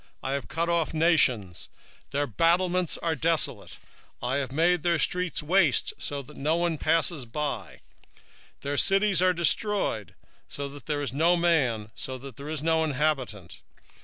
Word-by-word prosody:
3:6 -, -, -31 dB, 0.2 s
I 135 Hz, -, -2 dB
have 140 Hz, -, -3 dB
cut 165 Hz, +1 st, -1 dB
off 170 Hz, -2 st, 0 dB
the -, -, -3 dB
nations: 130 Hz, -, +2 dB, 0.4 s
their 145 Hz, +1 st, 0 dB
towers 175 Hz, -, +1 dB
are 165 Hz, -1 st, +1 dB
desolate; 160 Hz, +2 st, 0 dB, 0.4 s
I 135 Hz, +3 st, -1 dB
made 170 Hz, +4 st, +2 dB
their 170 Hz, +1 st, +2 dB
streets 180 Hz, 0 st, -1 dB
waste, 165 Hz, -3 st, +2 dB, 0.2 s
that 140 Hz, 0 st, -7 dB
none 165 Hz, +2 st, 0 dB
passeth 155 Hz, -7 st, 0 dB
by: 135 Hz, -, -4 dB, 0.8 s
their 145 Hz, +1 st, -3 dB
cities 195 Hz, 0 st, +3 dB
are 185 Hz, 0 st, +5 dB
destroyed, 170 Hz, -, -1 dB, 0.3 s
so 140 Hz, 0 st, -4 dB
that 145 Hz, 0 st, -12 dB
there 145 Hz, -2 st, -1 dB
is 130 Hz, -3 st, -3 dB
no 170 Hz, +5 st, +3 dB
man, 130 Hz, -11 st, +1 dB, 0.2 s
that 130 Hz, +1 st, -7 dB
there 140 Hz, +4 st, -8 dB
is 155 Hz, -2 st, -3 dB
none 160 Hz, -1 st, +2 dB
inhabitant. 130 Hz, -, -2 dB
155 Hz, 150 wpm, -27 LUFS, 135-170 Hz, 0.8 s, are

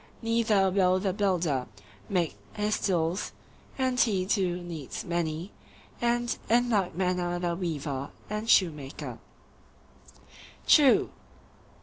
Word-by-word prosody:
Neither 225 Hz, -4 st, +2 dB
will 185 Hz, -1 st, +3 dB
the 190 Hz, -1 st, -1 dB
builder 175 Hz, -, 0 dB, 0.4 s
make 175 Hz, -4 st, 0 dB, 0.2 s
his 210 Hz, 0 st, 0 dB
tools—and 195 Hz, +8 st, -2 dB
he 195 Hz, -7 st, +2 dB
too 185 Hz, -3 st, +1 dB
needs 160 Hz, -6 st, -6 dB
many; 170 Hz, +2 st, -2 dB, 0.5 s
and 240 Hz, 0 st, +1 dB
in 240 Hz, +2 st, +3 dB
like 195 Hz, -6 st, +1 dB
manner 180 Hz, -1 st, 0 dB
the 175 Hz, -1 st, -1 dB
weaver 145 Hz, -6 st, -3 dB, 0.2 s
and 210 Hz, +2 st, -4 dB
shoemaker. 150 Hz, -7 st, +1 dB, 1.5 s
True. 285 Hz, -4 st, +5 dB
185 Hz, 100 wpm, -28 LUFS, 170-210 Hz, 1.5 s, True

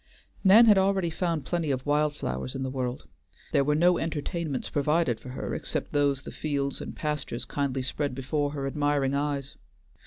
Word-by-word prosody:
Nan 210 Hz, +4 st, +8 dB
had 210 Hz, -3 st, +7 dB
already 190 Hz, -3 st, +2 dB
found 165 Hz, -3 st, -1 dB
plenty 170 Hz, -3 st, -1 dB
of 130 Hz, -2 st, -1 dB
wild 150 Hz, 0 st, +2 dB
flowers 65 Hz, -, -4 dB
in 135 Hz, -, -3 dB
the 130 Hz, -, -3 dB
world; 125 Hz, -, -3 dB, 0.4 s
there 140 Hz, -, +3 dB
were 150 Hz, +2 st, +2 dB
no 175 Hz, +3 st, +4 dB
entertainments 160 Hz, -2 st, -3 dB
provided 150 Hz, -4 st, +1 dB
for 125 Hz, -, -10 dB
her 125 Hz, -, -4 dB
except -, -, -3 dB
those 140 Hz, -2 st, +1 dB
the -, -, -8 dB
fields 140 Hz, -2 st, -2 dB
and -, -, -7 dB
pastures 150 Hz, -5 st, -3 dB
kindly 135 Hz, -2 st, -2 dB
spread 140 Hz, +1 st, -2 dB
before 145 Hz, +3 st, -1 dB
her 140 Hz, -2 st, -3 dB
admiring 145 Hz, -1 st, +1 dB
eyes. 140 Hz, -1 st, -2 dB
145 Hz, 180 wpm, -27 LUFS, 135-160 Hz, 0.4 s, Nan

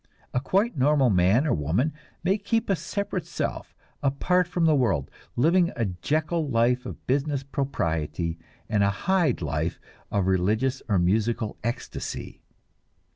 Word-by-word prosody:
A 125 Hz, -, +2 dB
quite 195 Hz, -, +1 dB
normal 135 Hz, -2 st, +3 dB
man 95 Hz, -, +4 dB
or 155 Hz, -, +2 dB
woman 85 Hz, -, 0 dB, 0.3 s
may 190 Hz, +4 st, +2 dB
keep 215 Hz, +1 st, 0 dB
a -, -, +4 dB
separate 200 Hz, +5 st, -3 dB
self, -, -, -4 dB, 0.3 s
apart 165 Hz, +6 st, +2 dB
from 175 Hz, -1 st, 0 dB
the 160 Hz, -, +5 dB
world, 120 Hz, -, +1 dB, 0.2 s
living 170 Hz, +7 st, +3 dB
a 115 Hz, -, 0 dB
Jekyll 155 Hz, -, -1 dB
life 125 Hz, +1 st, +2 dB
of -, -, -9 dB
business 140 Hz, +1 st, 0 dB
propriety 85 Hz, -, -2 dB, 0.3 s
and 105 Hz, -2 st, +2 dB
a 100 Hz, -, +4 dB
Hyde 175 Hz, -, +1 dB
life -, -, -2 dB, 0.3 s
of 100 Hz, -2 st, +1 dB
religious 105 Hz, +8 st, +1 dB
or 100 Hz, -, +3 dB
musical 110 Hz, +5 st, +1 dB
ecstasy. 120 Hz, +2 st, -5 dB
130 Hz, 140 wpm, -26 LUFS, 100-160 Hz, 0.3 s, the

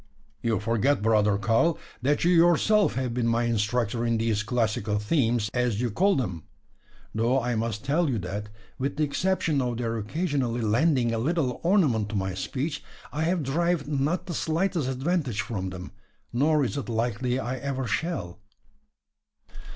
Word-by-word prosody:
"You 115 Hz, -2 st, 0 dB
forget, 115 Hz, +3 st, +1 dB
brother 105 Hz, -2 st, +3 dB
Karl, 115 Hz, -, +2 dB, 0.2 s
that 145 Hz, +4 st, +1 dB
you 175 Hz, -, +4 dB
yourself 175 Hz, -, +4 dB
have 130 Hz, -2 st, -1 dB
been 120 Hz, -1 st, 0 dB
my 115 Hz, +1 st, +2 dB
instructor 115 Hz, +1 st, 0 dB
in 115 Hz, -1 st, +1 dB
these 110 Hz, -2 st, 0 dB
classical 110 Hz, -2 st, 0 dB
themes, 115 Hz, -1 st, +1 dB
as 120 Hz, -4 st, 0 dB
you 120 Hz, -1 st, 0 dB
call 195 Hz, -, +3 dB
them. 90 Hz, -, -2 dB, 0.7 s
Though 115 Hz, +4 st, +2 dB
I 125 Hz, -1 st, -1 dB
must 110 Hz, +1 st, -2 dB
tell 155 Hz, +3 st, +2 dB
you 125 Hz, -, 0 dB
that, 100 Hz, +2 st, -5 dB, 0.3 s
with 135 Hz, +2 st, -2 dB
the 155 Hz, -, +2 dB
exception 160 Hz, -1 st, 0 dB
of 120 Hz, -2 st, -2 dB
their 115 Hz, -1 st, -2 dB
occasionally 130 Hz, -, -1 dB
lending 120 Hz, +2 st, +2 dB
a 115 Hz, -, 0 dB
little 140 Hz, -1 st, 0 dB
ornament 150 Hz, -, +2 dB
to 110 Hz, -, -4 dB
my 95 Hz, -1 st, -1 dB
speech, 140 Hz, -, -3 dB, 0.3 s
I 155 Hz, +2 st, 0 dB
have 170 Hz, -1 st, +1 dB
derived 165 Hz, +2 st, 0 dB
not 150 Hz, +5 st, 0 dB
the 180 Hz, -, -5 dB
slightest 165 Hz, -2 st, 0 dB
advantage 135 Hz, -, -1 dB
from 100 Hz, -4 st, -4 dB
them; 90 Hz, -1 st, -8 dB, 0.4 s
nor 145 Hz, +3 st, +3 dB
is 135 Hz, -, -3 dB
it 140 Hz, -, -4 dB
likely 120 Hz, +2 st, 0 dB
I 130 Hz, +1 st, -3 dB
ever 135 Hz, 0 st, -3 dB
shall." 110 Hz, -, -3 dB
125 Hz, 165 wpm, -26 LUFS, 110-150 Hz, 0.7 s, you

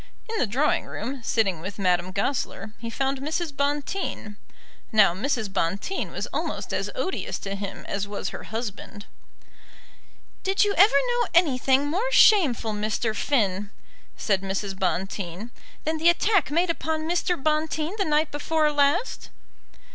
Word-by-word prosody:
In 450 Hz, 0 st, -3 dB
the 250 Hz, -, +2 dB
drawing 270 Hz, +9 st, +1 dB
room, 260 Hz, +4 st, -5 dB
sitting 205 Hz, -7 st, +1 dB
with 190 Hz, +3 st, -6 dB
Madame 180 Hz, -2 st, +1 dB
Goesler, 215 Hz, +1 st, -2 dB
he 230 Hz, -, -5 dB
found 270 Hz, +3 st, -1 dB
Mrs. 305 Hz, +2 st, -3 dB
Bonteen. 285 Hz, -, -2 dB, 0.6 s
Now 215 Hz, -5 st, +5 dB
Mrs. 220 Hz, 0 st, -2 dB
Bonteen 195 Hz, -, -1 dB
was -, -, -3 dB
almost -, -, -3 dB
as -, -, -1 dB
odious 380 Hz, -7 st, -2 dB
to 195 Hz, -, -5 dB
him 200 Hz, 0 st, -6 dB
as 200 Hz, 0 st, -2 dB
was 205 Hz, 0 st, -4 dB
her -, -, -8 dB
husband. 215 Hz, -2 st, -6 dB, 1.4 s
"Did 390 Hz, +2 st, +2 dB
you 410 Hz, -, +1 dB
ever 400 Hz, -, +8 dB, 0.2 s
know 485 Hz, 0 st, +1 dB
anything 270 Hz, -4 st, +3 dB
more 385 Hz, +12 st, -1 dB
shameful, 290 Hz, -, +5 dB
Mr. 215 Hz, +1 st, -1 dB
Finn," 205 Hz, -5 st, 0 dB, 0.5 s
said 195 Hz, -3 st, +1 dB
Mrs. 195 Hz, +1 st, -3 dB
Bonteen, 190 Hz, +2 st, -2 dB, 0.3 s
"than 315 Hz, +1 st, -1 dB
the 330 Hz, +2 st, +5 dB
attack 365 Hz, -1 st, +3 dB
made 335 Hz, +3 st, +2 dB
upon 320 Hz, -1 st, -2 dB
Mr. 355 Hz, +1 st, +1 dB
Bonteen 310 Hz, +3 st, 0 dB
the -, -, +3 dB
night 305 Hz, 0 st, +1 dB
before 305 Hz, +1 st, +1 dB
last?" 290 Hz, +10 st, +1 dB
270 Hz, 145 wpm, -25 LUFS, 205-320 Hz, 1.4 s, ever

